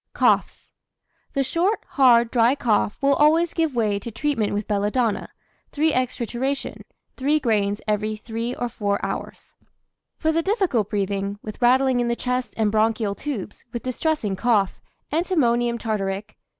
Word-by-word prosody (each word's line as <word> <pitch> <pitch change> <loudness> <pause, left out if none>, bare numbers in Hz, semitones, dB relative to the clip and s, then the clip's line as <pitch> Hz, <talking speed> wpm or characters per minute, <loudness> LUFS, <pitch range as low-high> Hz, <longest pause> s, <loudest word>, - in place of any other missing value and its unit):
COUGHS. - - +1 0.6
The 275 -2 +1
short, 355 +10 0
hard, 235 -4 +5
dry 240 +2 +4
cough 215 -6 +1
will 280 0 +5
always 320 +4 +3
give 320 -5 0
way 210 -4 +1
to 235 - -6
treatment 230 -1 -1
with 205 0 -2
belladonna, 210 +2 0 0.4
3^{×} 310 +1 +2
trituration, 255 +2 -2 0.4
3 290 +3 +2
grains 205 -5 0
every 215 0 0
3 230 +3 -4
or 245 - -2
4 205 -3 -2
hours. - - -6 0.6
For 315 - +1
the 330 +1 +1
difficult 370 - 0
breathing, 200 -1 -2
with 215 +2 -8
rattling 255 +1 +4
in 240 - +1
the 235 - 0
chest 250 +1 -2
and 215 -2 +2
bronchial 220 -1 +1
tubes, 225 -5 -6
with 235 - -5
distressing 255 -5 -1
cough, 205 -2 +1 0.3
antimonium 240 -9 +1
tartaric. 205 -3 -3
235 Hz, 145 wpm, -23 LUFS, 210-275 Hz, 0.6 s, hard